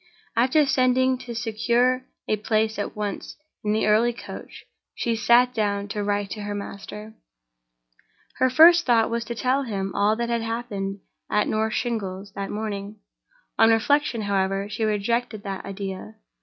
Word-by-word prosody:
After 260 +6 +4
sending 260 -1 +3
to 245 -2 -7
secure 245 +3 +1 0.2
a 215 - +2
place 215 +1 0
at 205 - -4
once 210 -1 -5 0.3
in 210 - 0
the 215 - +1
early 225 +3 +3
coach, 235 - -10 0.3
she 230 -1 -1
sat 240 +3 +4
down 205 -3 -1
to 205 0 -3
write 205 -1 -1
to 215 - -5
her 205 0 -4
master. 210 +2 -8 1.2
Her 260 - +3
first 335 +5 +7
thought 230 -2 +3
was 235 0 -1
to 235 - -5
tell 255 +3 +1
him 195 -6 -3
all 210 +2 +2
that 235 +1 -2
had 235 -1 0
happened 210 -4 -4 0.3
at 210 - +2
North 220 +1 0
Shingles 200 -5 -3
that 200 0 -4
morning. 205 -1 -4 0.6
On 225 - +7
reflection, 235 +2 +2
however, 195 0 0
she 220 +2 -4
rejected 215 +1 -1
the 195 -1 -5
idea. 190 - -6
220 Hz, 155 wpm, -24 LUFS, 205-240 Hz, 1.2 s, first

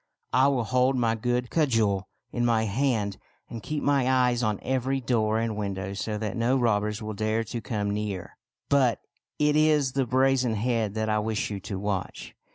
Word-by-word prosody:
I 130 +2 +5
will 135 -4 +1
hold 125 +4 +2
my 115 -3 +2
good 120 +2 -1
cudgel 110 - +1 0.2
in 120 - -1
my 115 -2 +2
hand, 110 -2 0 0.3
and 115 - -6
keep 150 +8 -4
my 140 -3 +2
eyes 125 -2 +2
on 110 -3 0
every 130 +1 0
door 110 -3 +1
and 115 -1 -1
window 100 -2 -3
so 105 +2 -3
that 105 -2 -3
no 120 +3 +2
robbers 105 -2 0
will 110 0 -4
dare 110 +2 0
to 115 +1 -5
come 105 -4 -2
near." 105 -3 -4 0.2
" - - -66
But 130 -6 +3 0.4
it 150 0 +2
is 150 -3 +3
the 135 -1 0
brazen 130 -1 +2
head 110 -2 -1
that 110 0 -1
I 105 0 +1
wish 110 0 -2
you 100 - -4
to 95 0 -5
watch. 100 -1 -4
115 Hz, 190 wpm, -26 LUFS, 105-130 Hz, 0.4 s, I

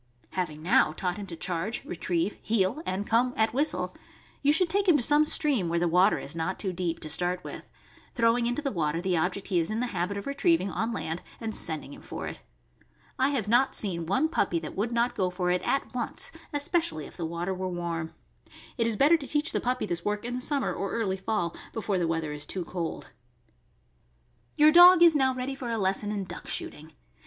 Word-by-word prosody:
Having 155 -5 -4
now 185 -4 +4
taught 180 +2 -3
him 205 -1 -7
to 170 - -7
charge, 180 +6 -3
retrieve, 175 +2 -2
heel, 220 +6 0
and 190 +2 -2
come 245 +3 +2
at 220 +1 +2
whistle, 290 +5 -1 0.5
you 285 - +4
should 340 +4 +4
take 395 +3 +1
him 340 -5 +6
to 250 - +2
some 295 +4 +6
stream, 275 - +2
where 170 - 0
the 175 +1 +1
water 180 +5 +4
is 140 - -6
not 165 +3 -2
too 190 -3 -3
deep, 170 -2 -2
to - - -6
start 175 +3 0
with, - - -9 0.5
throwing 235 0 +2
into 245 +5 -2
the 275 - -1
water 165 -3 -1
the 180 0 0
object 180 +4 -1
he 180 -3 +2
is 165 - -1
in 215 +1 -2
the 250 - 0
habit 180 +3 -2
of 200 - -6
retrieving 280 - +1
on 225 +5 -2
land 165 -6 -4 0.2
and 225 -1 -4
sending 155 -6 -2
him - - -12
for - - -7
it. - - -7 0.8
I 265 +1 +3
have 255 -8 -1
not 245 +5 +3
seen 170 -5 +2
one 265 - +2
puppy 200 - 0
that 160 -2 -6
would 215 +5 -1
not 235 +1 +1
go 185 -1 0
for 180 0 -1
it 180 - +1
at 275 - -1
once, 245 -2 -3 0.2
especially 290 - 0
if - - -12
the 170 - -5
water 170 +3 -3
were 185 0 -3
warm. 170 -2 -4 0.6
It 230 -2 +1
is 225 -2 0
better 300 +7 +5
to 280 -4 -8
teach 300 +1 +1
the - - -1
puppy 250 +1 -1
this 175 -1 -2
work 210 +1 -2
in 245 - -3
the 250 - -3
summer 280 +1 0
or 195 - -4
early 200 -5 -1
fall, 190 -3 -2 0.2
before 210 -4 -1
the 170 - 0
weather 165 -2 -2
is 150 0 -3
too 185 -3 -4
cold. 170 -2 -5 1.4
Your 300 +1 +6
dog 350 +1 +9
is 335 -2 +7
now 265 -2 +2
ready 255 +2 -3
for 260 -3 -6
a 230 - -1
lesson 195 +1 0
in 205 -2 -2
duck 185 - -9
shooting. 155 +1 -5
200 Hz, 220 wpm, -27 LUFS, 175-255 Hz, 1.4 s, dog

